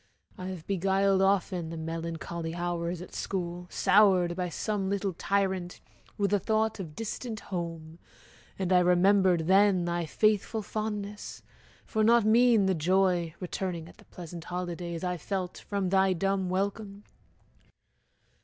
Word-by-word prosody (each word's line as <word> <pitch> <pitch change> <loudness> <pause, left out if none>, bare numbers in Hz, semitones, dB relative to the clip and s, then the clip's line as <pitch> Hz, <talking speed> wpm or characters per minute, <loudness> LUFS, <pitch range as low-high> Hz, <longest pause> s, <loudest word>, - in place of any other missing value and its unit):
I 185 - -7
have 180 -4 -7
beguiled 195 0 +2
Often 190 -3 +1
the 165 - -6
melancholy 165 +1 -4
hours 175 0 -3
at - - -13
school, 175 -2 -4
Soured 190 -3 +4
by 180 -1 -2
some 195 +2 -2
little 200 -1 -1
tyrant, 190 -1 -1 0.4
with 200 -1 0
the 205 - +3
thought 220 +2 0
Of 160 -6 -7
distant 225 0 -5
home, 165 -2 -5 0.6
and 190 -1 0
I 180 - +6
remembered 180 0 +4
then 190 +1 +4
Thy 170 -1 -2
faithful 215 +4 +1
fondness: 210 -1 -5 0.4
for 220 -3 0
not 230 0 +5
mean 230 -1 +5
the 190 - +2
joy, 175 0 +1
Returning 180 -2 -4
at - - -16
the - - -17
pleasant 170 -1 -9
holidays, 175 -1 -4
I 180 -1 -1
felt 185 +2 -4
from 200 -2 -2
thy 190 0 +3
dumb 190 +1 0
welcome. 200 +2 -3
185 Hz, 140 wpm, -29 LUFS, 175-200 Hz, 0.6 s, I